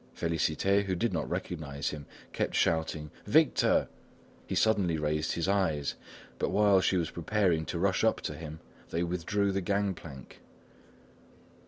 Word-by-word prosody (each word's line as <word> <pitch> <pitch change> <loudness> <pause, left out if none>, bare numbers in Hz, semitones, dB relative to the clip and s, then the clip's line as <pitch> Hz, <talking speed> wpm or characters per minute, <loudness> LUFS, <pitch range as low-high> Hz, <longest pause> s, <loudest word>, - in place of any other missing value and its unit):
Félicité, 85 +5 +1
who 95 -1 -1
did 115 +3 0
not 80 -3 -2
recognise 75 -5 -3
him, 75 -2 -8 0.3
kept - - -1
shouting: 80 -2 0 0.2
"Victor!" - - +4 0.6
He - - -2
suddenly 100 -7 +2
raised 75 +1 -1
his 85 +1 -1
eyes, 85 -8 +1 0.5
but - - 0
while 100 -2 +4
she 95 - +2
was 85 -3 -1
preparing 85 -2 +1
to 85 - -4
rush 95 +3 +1
up 110 - +3
to - - -3
him, 80 +1 -8 0.3
they 85 - -1
withdrew 90 +4 0
the 95 0 -1
gangplank. 90 -8 -3
85 Hz, 145 wpm, -30 LUFS, 80-100 Hz, 0.6 s, Victor